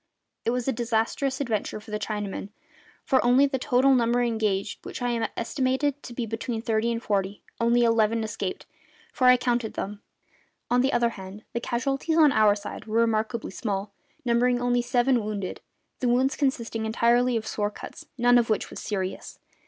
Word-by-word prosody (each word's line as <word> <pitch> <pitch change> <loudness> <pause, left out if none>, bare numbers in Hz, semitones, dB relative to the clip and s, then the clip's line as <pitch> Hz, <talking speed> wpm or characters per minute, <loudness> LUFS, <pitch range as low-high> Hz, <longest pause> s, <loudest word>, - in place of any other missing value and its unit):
It - - +2
was 245 +1 -1
a - - +3
disastrous 240 +3 -1
adventure 225 -6 -2
for 210 0 -13
the 210 - -2
Chinamen; 205 -1 -4 0.6
for 265 - +3
of 260 +3 +4
the 265 - -1
total 260 +2 +3
number 240 -1 +2
engaged 215 -4 -1
which - - -7
I 240 -2 -1
estimated 265 +4 0
to - - -9
be 240 0 -3
between 225 +1 -3
thirty 225 0 +1
and 230 0 -3
forty 200 -1 -1 0.2
only 235 +1 +3
eleven 230 -1 +2
escaped, 210 -3 -4 0.5
for 255 - +2
I 250 0 +8
counted 240 -2 -1
them. 205 +1 -5 0.7
On 245 0 +4
the 265 +2 +2
other 240 -1 +2
hand, 195 -1 -10
the 235 - -1
casualties 275 +7 -1
on 305 -3 +6
our 215 -4 +4
side 205 0 -7
were 225 +1 +1
remarkably 225 0 0
small, 200 0 -3 0.3
numbering 245 +1 +2
only 245 0 +1
seven 245 0 +2
wounded, 205 -3 -4 0.4
the 250 - +1
wounds 260 +3 +2
consisting 235 -5 -1
entirely 240 +2 +3
of 220 - -4
sword 205 -1 -2
cuts, - - -10
none 245 0 +5
of 230 - 0
which 215 - -1
was - - -7
serious. 190 -3 -4
235 Hz, 175 wpm, -26 LUFS, 215-245 Hz, 0.7 s, I